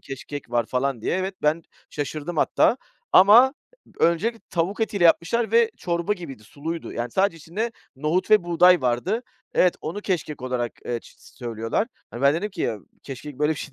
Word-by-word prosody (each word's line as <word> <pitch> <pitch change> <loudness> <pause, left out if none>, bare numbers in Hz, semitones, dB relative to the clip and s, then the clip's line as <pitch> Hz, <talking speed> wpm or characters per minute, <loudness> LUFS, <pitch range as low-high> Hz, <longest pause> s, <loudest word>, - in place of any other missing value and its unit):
keşkek 140 0 -8
var 120 -2 +1
falan 130 -1 -1
diye. - - 0
Evet, 190 +1 -2
ben 155 +2 +2 0.3
şaşırdım 155 +3 -4
hatta 230 - +3 0.4
ama 230 +8 +7 0.5
öncelikle 220 +8 +2
tavuk 185 +4 -1
etiyle 205 -5 0
yapmışlar 175 +8 +3
ve 465 -1 +5
çorba 170 +3 -1
gibiydi, 155 - -8
suluydu. 160 +6 -6
Yani 120 0 -3
sadece 190 - +1
içinde 205 +9 -4 0.2
nohut 155 +6 -1
ve 210 -5 +6
buğday 175 +1 +5
vardı. 130 - 0 0.3
Evet, 180 - +4
onu 165 +7 -5
keşkek 170 -8 -3
olarak, 125 -2 -2
eee, 120 -1 -2
ç - - -18
s - - -19
söylüyorlar. 115 - -2 0.2
Hani, 120 +3 -7
ben 140 +2 +5
dedim 210 +6 -2
ki: 185 -4 -8
"Ya, 110 - -1 0.2
keşkek 140 +1 -8
böyle 150 +1 +2
bir 155 - -7
şey 145 - -7
165 Hz, 180 wpm, -24 LUFS, 135-195 Hz, 0.5 s, ama